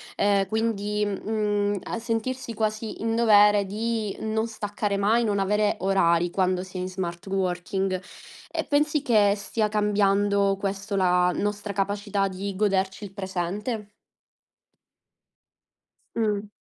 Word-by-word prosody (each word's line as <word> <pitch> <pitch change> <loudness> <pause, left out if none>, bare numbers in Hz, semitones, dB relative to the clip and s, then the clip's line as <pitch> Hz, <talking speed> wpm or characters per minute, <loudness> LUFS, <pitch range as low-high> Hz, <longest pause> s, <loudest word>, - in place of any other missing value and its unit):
ehm, 200 -1 +2
quindi 210 -1 -1
mhmm 205 0 -1
a - - -4
sentirsi 235 +2 -3
quasi 215 0 -3
in 225 0 0
dovere 210 -3 +5
di 220 +1 -2
non 220 +1 -1
staccare 205 -2 -3
mai, 220 +4 +3
non 205 -2 0
avere 210 +2 +1
orari 175 -2 +2
quando 185 0 +1
si 185 0 -9
è - - -2
in 185 - -3
smart 175 -2 -5
working. 190 0 -1 0.5
E - - -1
pensi 300 0 +2
che 210 -6 +4
stia 210 +2 -1
cambiando, 200 -1 +2
questo, 200 +1 -3
la 180 -1 +3
nostra 205 0 -2
capacità 200 0 0
di 195 +1 -5
goderci 195 -1 0
il 195 -1 -8
presente? 200 +3 -3 2.3
Mh. 210 -2 0
205 Hz, 125 wpm, -25 LUFS, 195-215 Hz, 2.3 s, dovere